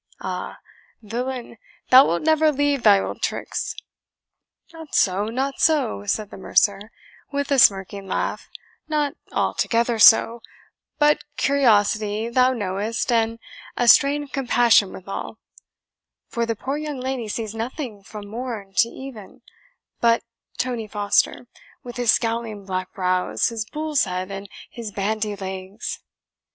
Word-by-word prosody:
Ah! - - -5 0.5
villain, 240 +2 -5 0.3
thou 260 +2 +9
wilt 170 - -1
never 315 0 +4
leave 285 -1 0
thy 205 -3 +6
old - - -5
tricks." - - -3 1.0
"Not 320 -2 -9
so 195 +1 +2
not 265 +5 -3
so," 280 -10 +2
said 210 0 -1
the - - -9
mercer, 200 +2 +1 0.4
with 285 0 -2
a 275 - +4
smirking 195 -2 +3
laugh - - -3 0.4
"not 295 -2 0 0.2
altogether 235 0 0
so 230 +2 +6 0.6
but 295 0 +3
curiosity, 215 -4 +2
thou 255 +1 +3
knowest, 210 +1 -2
and 230 -1 +1 0.4
a 245 - +1
strain 280 +5 +5
of 285 - -13
compassion 240 -6 +3
withal; 195 +1 -7 0.9
for 235 -2 -2
the 230 - -1
poor 270 +6 -3
young 300 -3 -5
lady 255 -3 -3
sees 215 0 -4
nothing 230 -1 -5
from 205 +1 -10
morn 220 -3 -6
to 235 - +4
even 250 -2 -11 0.6
but 230 -1 +3 0.3
Tony 240 -3 -2
Foster, 205 +3 +1 0.4
with 245 0 -9
his 240 -2 +4
scowling 225 -3 -2
black 185 -1 -4
brows, 185 -2 0
his 225 -2 -5
bull's 305 -1 0
head, 185 0 -4
and 195 0 -7 0.2
his 230 -3 -7
bandy 210 +1 -2
legs." 190 +1 -6
230 Hz, 135 wpm, -22 LUFS, 205-260 Hz, 1.0 s, thou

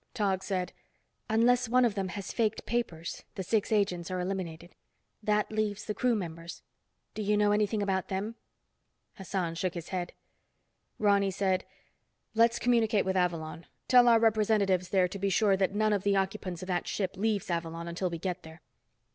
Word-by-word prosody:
Tog 195 -5 +1
said, 185 -3 -2 0.6
"Unless 240 +2 +3
one 250 +1 +4
of 230 - +1
them 195 -2 -2
has 190 +2 -6
faked 220 -2 0
papers, 175 -9 -3
the 190 - -3
six 210 +4 0
agents 195 -5 +1
are 185 0 -2
eliminated. 180 -2 -4 0.5
That 210 0 +1
leaves 215 -1 -1
the 210 - -2
crew 245 +3 +1
members. 170 -3 -6 0.5
Do 215 - -4
you 210 0 +2
know 205 0 +3
anything 210 0 +1
about 190 -2 -1
them?" 195 +4 -3 0.8
Hassan 185 -3 -2
shook 180 +1 -2
his 170 -1 -6
head. 180 -2 -3 0.8
Ronny 200 -2 +3
said, 190 -1 0 0.7
"Let's 230 +1 +4
communicate 230 -3 +2
with 190 0 0
Avalon. 165 -3 -1 0.2
Tell 245 -1 +7
our 230 -1 +6
representatives 210 -4 +2
there 185 -2 +3
to 195 +2 -7
be 200 +1 0
sure 200 0 +3
that 190 +1 0
none 215 0 +2
of 200 - +1
the 200 +1 +2
occupants 190 -2 -2
of - - -7
that 180 -2 -1
ship 190 -2 -2
leaves 205 -2 -1
Avalon 170 0 -3
until 170 +2 -2
we 170 - -4
get 180 +1 -3
there." 160 -1 -13
195 Hz, 175 wpm, -30 LUFS, 180-215 Hz, 0.8 s, Tell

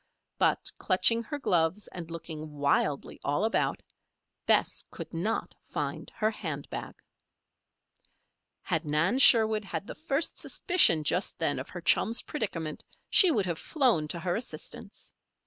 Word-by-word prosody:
But - - +2
clutching 195 +5 +2
her 265 +6 -5
gloves 180 - 0
and 170 -2 -8
looking 155 -2 -8
wildly 145 0 0
all 145 +7 0
about, 225 - -1 0.6
Bess - - +3
could - - -9
not 200 +7 -2 0.2
find - - -4
her 215 0 0
hand 155 -9 -6
bag. - - -6 1.7
Had 165 - -1
Nan 165 - +1
Sherwood 220 -5 +6
had 195 - -5
the - - -7
first 310 0 -1
suspicion 340 - +3
just 180 +5 0
then - - 0
of - - -7
her - - -8
chum's 230 +2 +3
predicament 165 - -4 0.3
she 375 - +7
would 215 - +1
have 170 -3 -3
flown 245 - +1
to 170 - -1
her 175 0 -1
assistance. 230 - -8
185 Hz, 140 wpm, -28 LUFS, 160-230 Hz, 1.7 s, she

